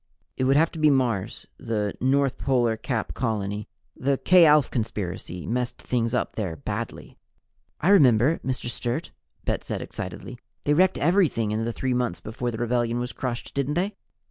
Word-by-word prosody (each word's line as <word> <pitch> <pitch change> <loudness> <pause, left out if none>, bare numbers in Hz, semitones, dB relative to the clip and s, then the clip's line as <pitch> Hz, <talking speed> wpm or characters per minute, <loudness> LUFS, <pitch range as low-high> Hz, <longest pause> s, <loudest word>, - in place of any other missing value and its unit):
"It 130 - 0
would 135 +1 +4
have 160 +3 +4
to 165 - -8
be 155 0 +5
Mars, 125 -8 0
the 105 -3 -2
North 135 +1 +2
Polar 120 -4 +2
Cap 110 0 -3
colony. 105 -3 -2 0.3
The 135 +1 0
K 180 +1 +6
Alph 150 -2 +5
Conspiracy 95 -6 -4
messed 125 +1 -2
things 115 -1 -1
up - - -1
there 95 -7 -2
badly." 70 - -6 0.6
"I 175 - +1
remember, 140 - +5
Mr. 130 -2 -3
Sturt!" 120 +5 -3 0.3
Bet - - -1
said - - -3
excitedly. - - -7 0.2
"They 145 - +2
wrecked 185 +4 +4
everything 150 - +2
in 110 +1 -1
the 115 - -1
three 130 +2 -2
months 125 -8 -1
before 120 +3 -4
the 115 - -4
rebellion 120 0 0
was 125 +1 -3
crushed, 120 -2 -4
didn't 140 +1 -1
they?" 190 +4 0
125 Hz, 170 wpm, -25 LUFS, 115-140 Hz, 0.6 s, K